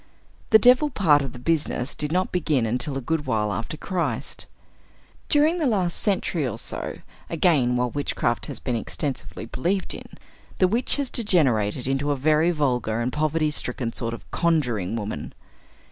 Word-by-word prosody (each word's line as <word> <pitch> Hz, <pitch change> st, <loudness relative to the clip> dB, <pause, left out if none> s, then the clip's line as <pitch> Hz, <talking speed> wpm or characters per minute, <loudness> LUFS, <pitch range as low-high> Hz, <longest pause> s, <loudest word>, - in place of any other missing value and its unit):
The 220 Hz, -, +8 dB
devil 250 Hz, +6 st, +5 dB
part 160 Hz, -, +4 dB
of 135 Hz, -2 st, -4 dB
the -, -, -10 dB
business 145 Hz, -1 st, -1 dB
did 150 Hz, 0 st, -3 dB
not 185 Hz, +2 st, +1 dB
begin 150 Hz, -8 st, +1 dB
until 125 Hz, +5 st, -2 dB
a -, -, -3 dB
good 160 Hz, -3 st, -1 dB
while 105 Hz, -4 st, 0 dB
after 115 Hz, +7 st, -4 dB
Christ. 180 Hz, +1 st, -3 dB, 0.8 s
During 310 Hz, +4 st, +3 dB
the 305 Hz, -, +2 dB
last 185 Hz, -7 st, +1 dB
century 180 Hz, -, 0 dB
or 115 Hz, -, -4 dB
so, -, -, -5 dB, 0.3 s
again, 150 Hz, -7 st, +3 dB
while 125 Hz, 0 st, 0 dB
witchcraft 120 Hz, -4 st, -1 dB
has -, -, -6 dB
been 125 Hz, -, -2 dB
extensively 130 Hz, 0 st, -4 dB
believed 175 Hz, -, -1 dB
in, -, -, -9 dB, 0.5 s
the 185 Hz, -, +4 dB
witch 230 Hz, +6 st, 0 dB
has 280 Hz, -3 st, -2 dB
degenerated 130 Hz, -, +1 dB
into 135 Hz, +2 st, 0 dB
a 145 Hz, -, +2 dB
very 155 Hz, +4 st, +3 dB
vulgar 125 Hz, -8 st, 0 dB
and 120 Hz, +2 st, -1 dB
poverty 155 Hz, 0 st, +1 dB
stricken 125 Hz, -4 st, -3 dB
sort 115 Hz, 0 st, -3 dB
of -, -, -16 dB
conjuring 120 Hz, -, +1 dB
woman. 105 Hz, -9 st, -5 dB
145 Hz, 165 wpm, -24 LUFS, 125-175 Hz, 0.8 s, The